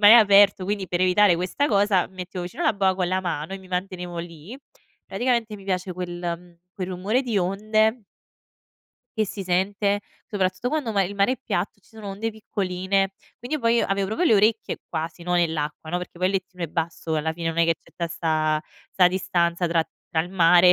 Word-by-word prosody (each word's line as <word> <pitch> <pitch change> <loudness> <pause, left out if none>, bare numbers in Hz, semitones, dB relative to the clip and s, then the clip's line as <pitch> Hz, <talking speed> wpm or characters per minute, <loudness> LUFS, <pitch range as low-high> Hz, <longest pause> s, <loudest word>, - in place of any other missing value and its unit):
ma 205 - +8
è - - +11
aperto 200 -4 +7
quindi 200 -1 -2
per 175 - -1
evitare 185 0 +5
questa 185 +11 0
cosa 200 -3 +3
mi 190 - -22
mettevo 180 0 -5
vicino 175 - -5
la - - +4
boa 190 -2 +2
con 180 -1 0
la 185 0 +1
mano, 165 -1 -3
e 195 - -4
mi 190 -1 -15
mantenevo 180 -1 -4
lì 170 - -8 0.5
praticamente 235 -4 -1
mi 195 - -13
piace 185 -1 -2
quel, 180 0 -5 0.3
mhmm, 175 -1 -19 0.2
quel 185 -1 -4
rumore 195 +7 0
di 235 -5 -2
onde 215 +5 +1 1.2
che 215 - +2
si 195 0 -6
sente, 200 +3 +1 0.3
soprattutto 190 +3 -1
quando 300 -6 -1
uma 200 -3 +2
il 195 +2 -3
mare 200 +5 +3
è 260 - -4
piatto, 200 +1 -2
e - - -32
ci - - -26
sono 220 -2 -9
onde 215 +4 -3
piccoline. 195 -2 -1 0.3
Quindi 250 +6 -3
io, - - -7
poi, 230 0 +3
avevo 195 0 0
proprio 330 - 0
le 220 - +6
orecchie, 215 +2 +2
quasi, 165 +1 -4
no, 180 +1 -1
nell'acqua, 160 -2 -1
no, 180 - 0
perché 180 -1 -9
poi 185 - +2
il 195 - -2
lettino 185 -2 -3
è - - -2
basso, 165 0 -3
e - - +2
alla 160 +1 -2
fine 165 -1 -3
non 165 +1 -3
è 170 - +5
che 165 - +3
c'è - - -24
tutta 170 - -3
da - - -12
sta 155 -2 0 0.3
sta 180 -2 +5
distanza 175 -1 0
tra 165 -1 +1 0.2
tra 160 - +1
il 175 - -9
mare, 180 0 +6
185 Hz, 225 wpm, -24 LUFS, 175-205 Hz, 1.2 s, è